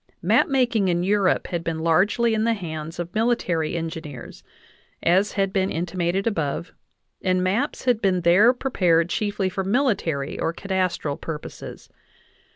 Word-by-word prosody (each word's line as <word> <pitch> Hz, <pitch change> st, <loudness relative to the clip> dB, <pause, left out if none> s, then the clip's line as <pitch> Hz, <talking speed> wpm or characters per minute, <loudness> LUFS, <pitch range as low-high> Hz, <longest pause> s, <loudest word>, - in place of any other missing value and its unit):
Map -, -, +4 dB
making 245 Hz, -7 st, +1 dB
in 175 Hz, -1 st, +1 dB
Europe 195 Hz, -1 st, +2 dB
had 170 Hz, -2 st, -3 dB
been 165 Hz, -1 st, -2 dB
largely 190 Hz, +8 st, +2 dB
in 220 Hz, 0 st, +1 dB
the 230 Hz, 0 st, +2 dB
hands 160 Hz, -4 st, -6 dB
of 175 Hz, 0 st, -5 dB
mili 230 Hz, +4 st, +2 dB
tary 165 Hz, -5 st, -2 dB
engineers, 160 Hz, -5 st, -7 dB, 0.6 s
as 185 Hz, +4 st, +3 dB
has 195 Hz, -1 st, 0 dB
been 190 Hz, -1 st, +1 dB
intimated 175 Hz, +3 st, -1 dB
above, 165 Hz, -6 st, -2 dB, 0.5 s
and 185 Hz, -1 st, +1 dB
maps 220 Hz, +12 st, -1 dB
had 245 Hz, -3 st, +2 dB
been 185 Hz, -3 st, +2 dB
there 185 Hz, +8 st, +6 dB
prepared 180 Hz, -10 st, +1 dB
chiefly 205 Hz, -2 st, -1 dB
for 190 Hz, +1 st, -3 dB
military 195 Hz, -, 0 dB
or 165 Hz, -, -1 dB
cadastral 185 Hz, -7 st, -2 dB
purposes. 155 Hz, -2 st, -8 dB
185 Hz, 150 wpm, -23 LUFS, 165-210 Hz, 0.6 s, there